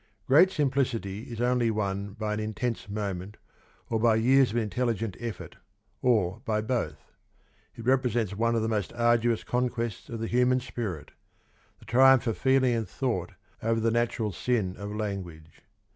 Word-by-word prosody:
Great 160 +8 +6
simplicity 125 - -1
is 115 - -6
only 120 -1 +2
won 100 -2 -2
by 105 -1 -3
an 105 - -2
intense 110 +1 -3
moment 100 -1 -4 0.5
or 115 - -1
by 115 0 +4
years 130 +4 +4
of 115 - -3
intelligent 115 -2 -1
effort, 120 0 -6 0.4
or 110 -5 +1
by 110 -5 0
both. 110 - -3 0.6
It 115 - -9
represents 120 -5 +1
one 115 +2 +1
of 115 - +1
the - - 0
most 105 -4 -1
arduous 120 -1 +2
conquests 120 -3 -2
of 115 - -5
the 115 - -2
human 125 +2 +2
spirit: 105 -11 -5 0.7
the - - -18
triumph 130 +1 +5
of 115 -3 0
feeling 130 -2 +3
and 115 -5 -2
thought 115 -10 -2 0.3
over 115 0 +1
the 115 0 +1
natural 115 -2 0
sin 100 -1 -1
of 100 0 -7
language. 95 -7 -6
115 Hz, 160 wpm, -28 LUFS, 105-125 Hz, 0.7 s, Great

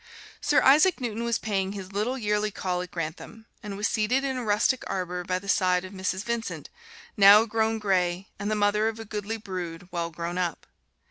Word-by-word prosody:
Sir 295 - +3
Isaac 305 +6 +5
Newton 235 -2 -3
was 235 -1 +1
paying 195 -2 -2
his 195 -2 -7
little 220 +6 -1
yearly 210 -2 0
call 180 -3 -2
at 180 - -7
Grantham; 170 +7 -6 0.2
and 200 -2 -6
was 210 - +1
seated 235 +5 +1
in 270 -1 -1
a 250 - -3
rustic 230 +5 +1
arbor 180 -1 -3
by 185 +1 -1
the 200 +2 -9
side 185 -2 +2
of 185 - -10
Mrs. 190 0 -2
Vincent, 235 -1 -4 0.4
now 205 +1 +8
grown 225 0 0
gray, 185 -2 0
and 205 0 -2
the 215 - +1
mother 210 +1 +2
of 225 0 -3
a 225 - -7
goodly 210 +1 -4
brood, 180 -5 -6
well 170 -1 -2
grown 170 +2 -4
up. 175 -3 -2
205 Hz, 200 wpm, -26 LUFS, 185-225 Hz, 0.4 s, now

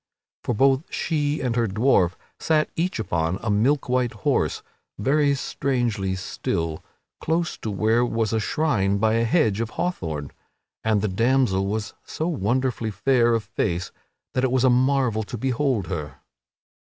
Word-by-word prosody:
For 120 - -1
both 135 +5 +2
she 150 -2 -1
and 125 -3 -1
her 120 -1 +2
dwarf 100 -4 +3 0.3
sat 155 -1 +1
each 175 +3 -1
upon 85 -4 -1
a 110 - 0
milk 130 +8 +2
white 125 -1 +1
horse, 105 - 0 0.3
very 140 +6 +2
strangely 120 -8 -1
still, 80 -3 -3 0.4
close 170 +2 -1
to 110 - -4
where 110 +4 +2
was 115 -2 0
a 110 - +2
shrine 105 -6 +1
by 110 +2 +2
a 115 +1 +2
hedge 115 - +2
of 115 - -2
hawthorne; 80 - -3 0.5
and 110 -2 +1
the - - +2
damsel 115 -1 +2
was 105 +1 -3
so 160 - -3
wonderfully 125 - 0
fair 120 +1 +2
of 115 - -1
face 90 -4 -2 0.4
that 130 - 0
it 130 - +3
was 130 -1 +2
a 130 - +5
marvel 130 -3 +2
to 110 +3 -6
behold 130 -3 0
her. 75 -6 -5
115 Hz, 155 wpm, -24 LUFS, 100-135 Hz, 0.5 s, a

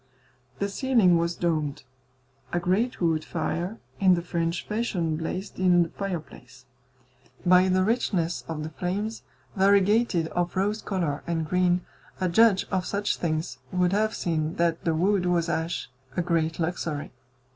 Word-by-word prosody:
The 200 - -1
ceiling 200 -6 +3
was 170 +1 -1
domed. 155 -5 -1 0.7
A 175 - +1
great 195 +8 0
wood 160 -2 +2
fire 175 +5 -3 0.2
in 190 -2 +5
the 170 - -3
French 170 0 -2
fashion 190 -8 -1
blazed 180 +5 -5
in 180 -2 +5
the 165 - -5
fireplace; 155 -10 -7 0.8
by 180 +1 +6
the 185 0 +3
richness 185 -6 0
of 155 -2 -4
the 155 - -5
flames, 205 +7 -3 0.3
variegated 200 -2 +3
of 175 +1 -2
rose 205 +3 0
colour 170 -7 -2
and 165 -2 -1
green, 180 +1 +2 0.4
a 185 - +1
judge 195 +2 +4
of 185 -2 +1
such 205 0 -1
things 155 -6 -2
would 180 0 +2
have 215 +1 +1
seen 160 -1 -1
that 170 -1 0
the 165 -1 +2
wood 185 +2 +2
was 175 -1 +1
ash 165 -4 -2 0.3
a 175 - +2
great 165 -2 0
luxury. 160 -3 -2
175 Hz, 150 wpm, -26 LUFS, 165-195 Hz, 0.8 s, by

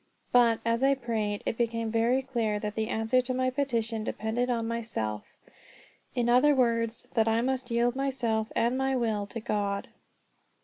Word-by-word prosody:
But, 235 -2 +4
as 230 +1 +1
I 275 +1 +4
prayed, 220 -5 -2
it 225 - -2
became 230 -1 -1
very 235 +4 +2
clear 230 -5 -1
that 210 0 -4
the 220 0 -2
answer 225 +4 +1
to 255 0 -3
my 255 0 +1
petition 235 -5 -1
depended 225 +3 -2
on 230 -2 0
myself; 220 - -4 0.8
in 240 -2 +1
other 255 +5 +5
words, 230 -2 0
that 225 -1 +2
I 225 +1 +2
must 260 -1 -2
yield 240 +1 +1
myself 245 -5 -1
and 235 +2 +2
my 265 0 0
will 220 -5 -1
to 230 - -6
God. 200 -2 -2
230 Hz, 170 wpm, -28 LUFS, 220-255 Hz, 0.8 s, other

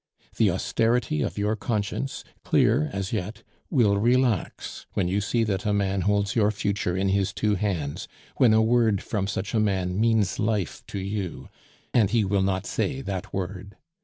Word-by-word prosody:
The - - +4
austerity 115 -8 0
of - - -2
your 105 +1 +1
conscience, 110 +5 -3 0.2
clear 145 +8 +3
as 100 0 -3
yet, 110 +2 -4 0.3
will 110 -9 +3
relax 120 -2 0
when 95 - 0
you 100 +3 0
see 115 +3 +1
that 100 -4 -1
a 105 - +1
man 100 -1 0
holds 100 +1 +1
your 105 -3 +4
future 100 -3 -1
in 95 +1 +1
his 95 0 +1
two 105 -1 0
hands, 90 -8 -2 0.3
when 125 -4 +5
a 110 0 +5
word 110 -3 +2
from 100 -3 -2
such 100 +1 -3
a 110 - +2
man 95 -2 0
means 110 -5 +2
life 105 -5 -1
to - - -6
you, 100 -2 -4 0.4
and 110 -6 +4
he 110 -1 +2
will 100 0 +1
not 95 0 0
say 135 -2 -2
that 100 -5 -5
word. 95 +1 -5
100 Hz, 175 wpm, -25 LUFS, 95-110 Hz, 0.4 s, when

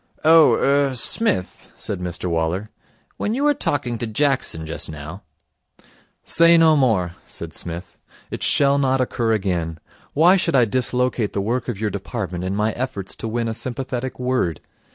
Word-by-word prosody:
'Oh 160 0 +7
er 140 -1 +2
Smith,' 125 - 0
said 100 - -4
Mr 90 -1 -5
Waller, 85 +5 -1 0.5
'when 215 - -1
you 275 - -1
were 295 0 +4
talking 135 - -2
to 120 - -3
Jackson 120 - 0
just 80 +1 -5
now 80 +5 -8 0.6
' - - -31
'Say 170 +1 +5
no 160 -1 +5
more,' 110 - +2 0.2
said - - -7
Psmith. 85 +1 -7 0.3
'It - - -5
shall 140 0 +3
not 135 -1 +1
occur 120 -2 0
again. 90 -6 -1 0.3
Why 175 +6 +5
should 170 -4 0
I 125 -3 +5
dislocate 125 -1 0
the - - -1
work 120 +4 -2
of 110 -5 -4
your 105 -1 -1
department 95 -3 -5
in 95 +1 -2
my 105 +2 +1
efforts 110 -6 -4
to - - -5
win 115 +1 -2
a 115 - -2
sympathetic 130 +1 -4
word? 125 - -1
120 Hz, 170 wpm, -21 LUFS, 95-135 Hz, 0.6 s, Oh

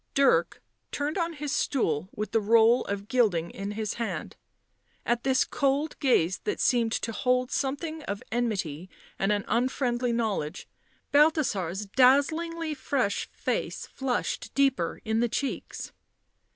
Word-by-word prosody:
Dirk 275 0 +3 0.3
turned 295 +2 -2
on 335 0 -1
his 295 -2 -4
stool 175 - 0
with 210 +1 -5
the 225 - +2
roll 230 +3 +5
of 200 0 -4
gilding 210 -9 +2
in 200 +1 -5
his 215 0 -3
hand. 230 - -4 0.7
At 240 0 +1
this 265 -1 +3
cold 280 +3 0
gaze, 190 - +2
that 420 - -1
seemed 235 -3 +2
to 230 - -1
hold 250 +2 +1
something 310 +4 -2
of 200 +1 -4
enmity 190 -9 -2 0.3
and 195 +2 +2
an 205 -1 0
unfriendly 245 0 0
knowledge, 205 -9 -2 0.4
Balthasar's 225 - +2
dazzingly 310 +8 +2
fresh 260 -6 -1
face - - -3
flushed 265 -3 -3
deeper 265 -11 +1
in 220 0 +1
the 240 0 +2
cheeks. 275 +4 -4
240 Hz, 135 wpm, -27 LUFS, 205-275 Hz, 0.7 s, roll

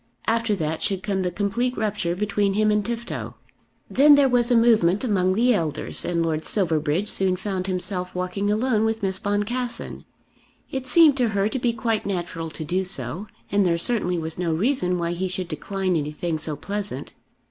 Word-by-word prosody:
After 230 -1 +1
that 160 -3 -3
should 190 -2 -1
come 195 -2 -1
the 180 - 0
complete 210 +7 -1
rupture 205 -5 -1
between 200 0 0
him 215 0 +3
and 210 0 +1
Tifto. 235 +2 -5 0.5
Then 290 +2 +6
there 285 -1 +5
was 245 -1 +2
a 245 - +4
movement 215 -5 +4
among 185 -6 +1
the 245 +3 +4
elders, 160 -7 +1
and 170 -1 0
Lord 160 -1 -1
Silverbridge 160 -1 +1
soon 190 -3 +2
found 190 -1 -3
himself 180 -1 -2
walking 185 +3 -2
alone 220 +1 +1
with 225 -1 -1
Miss 190 -1 -1
Boncassen. 225 +5 -3 0.7
It 265 -1 -4
seemed 300 +1 +6
to 245 -3 +2
her 195 +1 +2
to 265 - -3
be 240 -1 +1
quite 225 -2 -2
natural 175 -4 -3
to 155 - -6
do 180 +4 0
so, 180 - -5 0.2
and 200 0 +3
there 170 -2 +2
certainly 180 -2 0
was 160 0 -5
no 175 -2 0
reason 180 - +1
why 170 -1 -1
he 180 +2 -2
should 185 -1 -2
decline 185 +4 -2
anything 155 +2 -2
so 155 -1 -2
pleasant. 200 +7 -5
195 Hz, 185 wpm, -23 LUFS, 175-225 Hz, 0.7 s, Then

